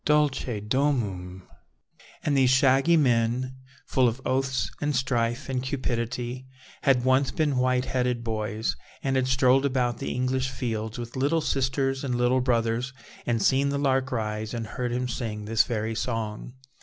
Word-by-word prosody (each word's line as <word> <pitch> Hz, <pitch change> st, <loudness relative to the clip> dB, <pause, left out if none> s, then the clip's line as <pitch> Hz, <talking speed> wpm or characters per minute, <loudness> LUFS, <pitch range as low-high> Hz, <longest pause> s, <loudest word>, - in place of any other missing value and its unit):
Dulce 145 Hz, -6 st, +1 dB
domum! 105 Hz, -9 st, -1 dB, 0.8 s
And 145 Hz, -, +1 dB
these 130 Hz, -2 st, +4 dB
shaggy 135 Hz, +5 st, +4 dB
men, 125 Hz, -1 st, +1 dB, 0.3 s
full 130 Hz, -2 st, +3 dB
of 115 Hz, +2 st, -1 dB
oaths 130 Hz, 0 st, 0 dB
and 145 Hz, -1 st, 0 dB
strife 125 Hz, 0 st, 0 dB
and 130 Hz, -2 st, -1 dB
cupidity, 125 Hz, -1 st, -3 dB, 0.3 s
had 130 Hz, -3 st, +3 dB
once 130 Hz, +1 st, +3 dB
been 150 Hz, -4 st, 0 dB
white 125 Hz, 0 st, +2 dB
headed 125 Hz, -2 st, -1 dB
boys, 110 Hz, -1 st, -2 dB, 0.3 s
and 135 Hz, -1 st, 0 dB
had 130 Hz, -1 st, +2 dB
strolled 130 Hz, +1 st, +4 dB
about 125 Hz, -3 st, 0 dB
the -, -, -3 dB
English 130 Hz, +1 st, 0 dB
fields 115 Hz, -3 st, -3 dB
with 120 Hz, -1 st, -7 dB
little 145 Hz, +5 st, +2 dB
sisters 135 Hz, -1 st, 0 dB
and 125 Hz, -3 st, -1 dB
little 125 Hz, +1 st, +2 dB
brothers, 120 Hz, +1 st, 0 dB, 0.3 s
and 115 Hz, -3 st, +1 dB
seen 140 Hz, +1 st, +3 dB
the 140 Hz, -, -1 dB
lark 135 Hz, -2 st, +1 dB
rise, 110 Hz, -1 st, -2 dB
and 115 Hz, -1 st, -3 dB
heard 120 Hz, +2 st, -3 dB
him 125 Hz, +1 st, -1 dB
sing 110 Hz, -4 st, -4 dB
this 110 Hz, +1 st, +3 dB
very 110 Hz, -1 st, -2 dB
song. 115 Hz, 0 st, -4 dB
125 Hz, 155 wpm, -26 LUFS, 115-135 Hz, 0.8 s, these